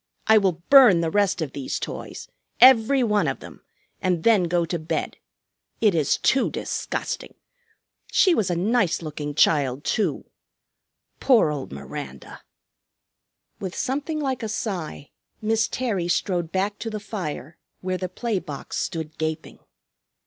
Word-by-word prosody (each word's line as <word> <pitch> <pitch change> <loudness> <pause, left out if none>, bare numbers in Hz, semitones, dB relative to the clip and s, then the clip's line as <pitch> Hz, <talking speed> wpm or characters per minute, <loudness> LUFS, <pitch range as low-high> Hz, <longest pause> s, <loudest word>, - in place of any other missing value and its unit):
I 220 -1 +6
will 180 -4 -1
burn 245 -11 +8
the 165 -1 -1
rest 200 -3 +1
of 145 - -5
these 135 -2 -3
toys, - - -7 0.3
every 255 +1 +6
one 210 -3 +2
of - - -2
them, - - -12 0.4
and 180 -4 0
then 215 -6 +4
go 170 0 +1
to 170 +1 -3
bed. 155 +2 -3 0.6
It 210 -4 +4
is 155 -4 +2
too 265 - +2
disgusting! - - -4 0.8
She 370 - +5
was 215 - +1
a 175 - 0
nice 195 -1 +1
looking 150 -1 -5
child, 140 -3 +2
too. 215 - -1 0.9
Poor 235 - +4
old 140 -3 -5
Miranda!" 70 +1 -8 1.2
With 190 -2 -5
something 290 +4 -2
like 265 -4 -2
a 220 - -3
sigh 180 -9 -4 0.3
Miss 220 0 +1
Terry 210 -9 -2
strode 175 -1 -1
back 200 +3 -1
to 225 - -4
the 215 -1 -4
fire, 170 - -6 0.2
where 185 0 -2
the 185 - -3
play 220 +2 -2
box 145 -5 -7
stood 160 -3 -4
gaping. 160 0 -4
185 Hz, 145 wpm, -24 LUFS, 160-220 Hz, 1.2 s, burn